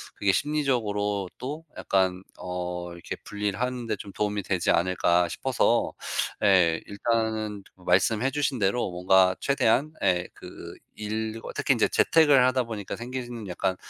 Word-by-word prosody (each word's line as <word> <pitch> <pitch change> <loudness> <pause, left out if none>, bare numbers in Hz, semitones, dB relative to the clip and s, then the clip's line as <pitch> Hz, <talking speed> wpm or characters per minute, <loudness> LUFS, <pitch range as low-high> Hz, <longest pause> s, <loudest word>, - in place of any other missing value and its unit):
그게 100 -1 +2
심리적으로 105 -9 0
또 150 +5 -6
약간 95 -1 0 0.2
어 90 -1 -4
이렇게 85 - -6
분리를 105 0 -3
하는데 125 -3 -2
좀 100 +1 -9
도움이 105 -1 -1
되지 95 -1 0
않을까 90 0 +2
싶어서 - - +1 0.5
예. 85 -4 +4
일단은 110 -1 -1 0.2
말씀해주신 125 +10 +2
대로 100 +3 +1
뭔가 95 +1 +3
최대한 140 +2 +2
예 90 0 +2
그 - - -10 0.2
일과 110 +1 -4
특히 - - +2
인제 - - +2
재택을 145 -6 +5
하다 130 0 +1
보니까 110 -4 -5
생기는 120 -3 -6
약간 95 +1 -1
105 Hz, 300 characters per minute, -26 LUFS, 95-120 Hz, 0.5 s, 재택을